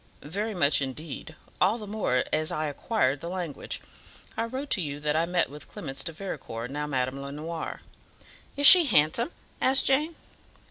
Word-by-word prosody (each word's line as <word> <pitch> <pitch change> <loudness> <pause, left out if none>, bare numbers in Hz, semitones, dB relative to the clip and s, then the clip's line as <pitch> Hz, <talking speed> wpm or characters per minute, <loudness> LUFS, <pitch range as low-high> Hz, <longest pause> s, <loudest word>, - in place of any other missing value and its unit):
"Very 205 +8 -3
much, 145 -4 +4
indeed; 150 +4 -6 0.3
all 195 +5 +4
the 215 - -7
more 200 -12 0
as 155 0 +1
I 155 - -1
acquired 145 - 0
the 170 - -5
language. 175 -6 -5 0.6
I 225 - -1
wrote 260 +4 -6
to 195 - +2
you 145 -3 -4
that 150 0 -1
I 165 +1 +1
met 175 -1 +1
with 150 +2 -11
Clemence 135 -3 -5
de 165 - -1
Vericourt, 135 -9 -6
now 150 +1 -3
Madame 130 -1 -2
Lenoir." 155 +4 -6 0.7
"Is 285 - +1
she 355 +2 +11
handsome?" 215 - +3 0.3
asked 265 +1 +4
Jane. 300 +5 +2
160 Hz, 170 wpm, -27 LUFS, 145-215 Hz, 0.7 s, she